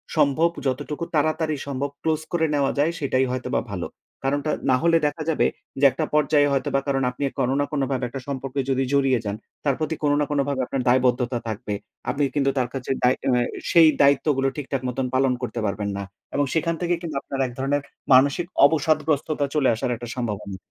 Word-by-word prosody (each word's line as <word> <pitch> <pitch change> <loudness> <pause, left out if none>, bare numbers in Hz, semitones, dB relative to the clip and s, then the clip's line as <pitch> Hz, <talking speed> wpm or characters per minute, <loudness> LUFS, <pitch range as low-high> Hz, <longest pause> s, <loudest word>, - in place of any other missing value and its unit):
সম্ভব 155 +2 +3 0.2
যতটুকু 145 +5 -3
তাড়াতাড়ি 155 +1 +1
সম্ভব 140 0 -2
ক্লোজ 160 -1 0
করে 165 -2 +2
নেওয়া 140 -1 +2
যায় 150 +4 +3
সেটাই 130 -3 +1
হয়তোবা 130 -1 -1
ভালো। - - -3 0.4
কারণটা 145 +3 0 0.2
না 130 - +5
হলে 165 0 +5
দেখা 150 +2 -4
যাবে 160 - +2 0.3
যে, 140 - +4
একটা 155 +5 -2
পর্যায়ে 150 -1 +4
হয়তোবা 135 0 +1
কারণ 135 -1 +1
আপনি 125 +3 -6 0.2
কোন 125 - +2
না 145 - +2
কোনভাবে 135 -3 -1
একটা 130 +2 -7
সম্পর্কে 135 0 -4
যদি 135 0 +2
জড়িয়ে 135 -3 +3
যান, 100 0 -2 0.3
তার 140 -3 +2
প্রতি 160 0 -1
কোন 145 - +3
না 150 - +2
কোনভাবে 140 -2 0
আপনার 130 +1 -2
দায়বদ্ধতা 125 -1 +2
থাকবে। 105 -1 -4 0.4
আপনি 145 - 0
কিন্তু 140 -1 +2
তার 125 -2 +1
কাছে 135 -1 -4
দায় 125 +1 +5
অ্যা 125 -2 +2 0.3
সেই 165 -2 +7
দায়িত্বগুলো 140 -1 +3
ঠিকঠাক 135 -2 -3
মত 125 - -4 0.2
পালন 130 0 +3
করতে 125 -1 -3
পারবেন 100 0 -2
না 100 - -3 0.3
এবং 145 0 +2
সেখান 165 +1 +1
থেকে 175 0 +1
কিন্তু 165 -4 -5
আপনার 135 - -6
এক - - -8
ধরনের 140 +2 0 0.3
মানসিক 140 +6 +4 0.2
অবসাদগ্রস্ততা 155 -1 +1
চলে 145 -3 +3
আসার 120 +2 -1
একটা 120 +1 -8
সম্ভাবনা। 105 -5 -4
140 Hz, 190 wpm, -24 LUFS, 130-150 Hz, 0.4 s, সেই